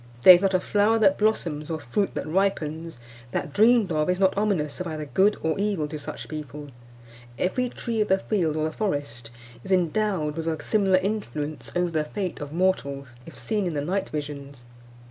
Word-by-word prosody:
There 185 - +12
is 175 - +4
not 195 -1 +2
a - - +4
flower 210 +4 +2
that 195 -3 +3
blossoms, 170 -8 0
or 160 -1 -2
fruit 145 +9 -2
that - - -3
ripens, 165 -4 -1 0.4
that, 145 - -3
dreamed 220 -1 +4
of, 155 +1 +1
is 180 0 +1
not 190 -1 +3
ominous 195 -8 -1
of 180 - -3
either 155 -2 -4
good 195 +8 +2
or 160 +3 0
evil 200 -7 0
to 155 0 -5
such 145 - -7
people. 150 -1 -7 0.7
Every 250 +7 0
tree 230 -2 -3
of 210 - +1
the 190 - +3
field 180 -6 -1
or 155 - -1
the 155 - -1
forest 145 - -3 0.3
is 195 - -7
endowed 180 -3 +1
with 165 0 -3
a 160 -2 -1
similar 195 -4 +3
influence 155 - -3
over 175 -1 +1
the 155 -2 0
fate 180 +1 -4
of 145 -1 -6
mortals, 140 -6 0 0.2
if 165 - -11
seen 210 -4 -1
in 170 - -3
the 145 - 0
night 195 +3 -1
visions. 140 -4 -6
175 Hz, 200 wpm, -25 LUFS, 150-200 Hz, 0.7 s, There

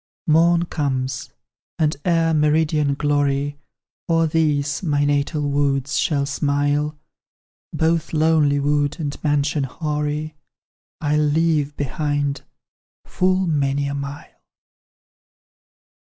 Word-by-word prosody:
"Morn 170 +2 +4
comes 135 -4 -2 0.5
and 155 -1 +1
ere 165 -2 +2
meridian 150 -1 +2
glory 145 0 0 0.5
O'er 165 0 +3
these, 150 -3 0
my 145 -5 +1
natal 145 +1 0
woods, 140 -1 0
shall 140 -3 +1
smile, 145 +1 0 0.7
Both 165 0 0
lonely 155 -2 +3
wood 145 +1 0
and 145 -3 -3
mansion 145 -1 +1
hoary 150 +2 -3 0.7
I'll 150 0 +1
leave 150 -1 +1
behind, 145 0 -1 0.6
full 185 +1 +1
many 140 -3 0
a 140 - -3
mile." 140 +1 -7
145 Hz, 95 wpm, -21 LUFS, 140-155 Hz, 0.7 s, Morn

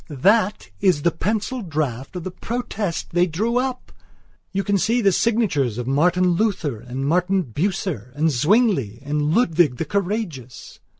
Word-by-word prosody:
That 200 - +1
is 180 -7 +2
the 170 - +3
pencil 215 +9 -2
draft 145 - -3
of 180 - -4
the 185 - -5
Protest 215 -4 -4
they 175 +1 +3
drew 215 +9 -1
up. 255 0 -3 0.6
You 195 0 -1
can 200 -1 +1
see 230 +6 +2
the 200 -4 +4
signatures 180 - +1
of 120 - -3
Martin 175 +7 +2
Luther, 170 - 0
and 125 +4 -5
Martin 180 +4 +2
Bucer, 150 - -3
and 155 +2 +2
Zwingli, 145 - +2
and 150 +2 0
Ludwig 165 - +3
the 165 - -2
Courageous...." 185 - -4
175 Hz, 155 wpm, -22 LUFS, 145-205 Hz, 0.6 s, the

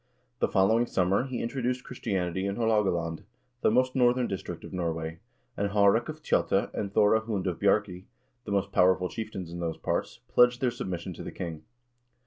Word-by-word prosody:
The - - +2
following 110 +5 +3
summer 95 +5 +1
he 130 -2 -3
introduced 125 0 -2
Christianity 95 -6 -2
in 100 - -2
Haalogaland, 95 -8 +1 0.4
the - - +4
most 130 +3 +2
northern 125 -1 +3
district 95 - -5
of - - -10
Norway, 80 -2 -3 0.4
and 100 0 -1
Ilaarek 100 +4 +3
of 155 0 -7
Tjotta 100 - +1
and 100 -2 -3
Thore 105 +2 +4
Hund 110 -4 -3
of 90 -3 -2
Bjarkey, 100 -2 +1 0.4
the - - -5
most 100 -1 0
powerful 90 0 +3
chieftains 100 -6 -6
in 85 - -6
those 85 -2 -3
parts, - - -2
pledged 125 0 +4
their 125 -2 +1
submission 95 -6 -5
to - - -8
the - - -6
king. 80 -3 -6
100 Hz, 175 wpm, -28 LUFS, 90-120 Hz, 0.4 s, the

